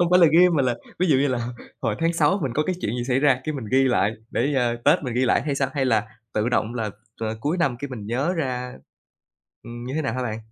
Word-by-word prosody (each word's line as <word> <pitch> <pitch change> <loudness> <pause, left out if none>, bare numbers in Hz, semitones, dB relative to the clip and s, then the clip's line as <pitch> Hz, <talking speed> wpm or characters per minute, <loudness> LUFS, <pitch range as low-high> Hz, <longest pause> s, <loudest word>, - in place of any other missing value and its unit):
hông 175 0 +2
phải 180 - +6
là 170 - +8
ghi 180 +2 +7
mà 155 -6 +2
là 125 -2 +1 0.2
ví 185 - +2
dụ 145 -5 +4
như 140 +1 +2
là 120 -2 -2 0.3
hồi 115 -4 0
tháng 165 +1 +2
Sáu 190 +4 +2
mình 130 -4 -1
có 155 - +2
cái 185 - 0
chuyện 115 +4 -2
gì 120 - -2
xảy 130 0 +2
ra 135 -4 +3
cái 155 - -2
mình 130 -5 -5
ghi 135 +1 +5
lại 110 -5 +2 0.2
để, 140 +5 0
ờ, 120 -3 +1
Tết 145 - +4
mình 125 -3 -3
ghi 130 +1 +2
lại - - +2
hay 145 -1 -1
sao, 140 -1 0
hay 135 -2 +1
là 110 -4 +2 0.3
tự 110 +2 +1
động 120 -1 0
là, 110 -3 -2 0.3
à, 110 -1 -3
cuối 150 +9 0
năm 140 -8 +1
cái 140 0 -5
mình 110 -5 -7
nhớ 135 +9 0
ra 125 -5 -3 0.9
ừm, 120 +1 -8
như 130 - -5
thế 155 - 0
nào 135 - -2
hả 130 - -2
bạn? 110 -3 -3
130 Hz, 285 wpm, -24 LUFS, 120-145 Hz, 0.9 s, là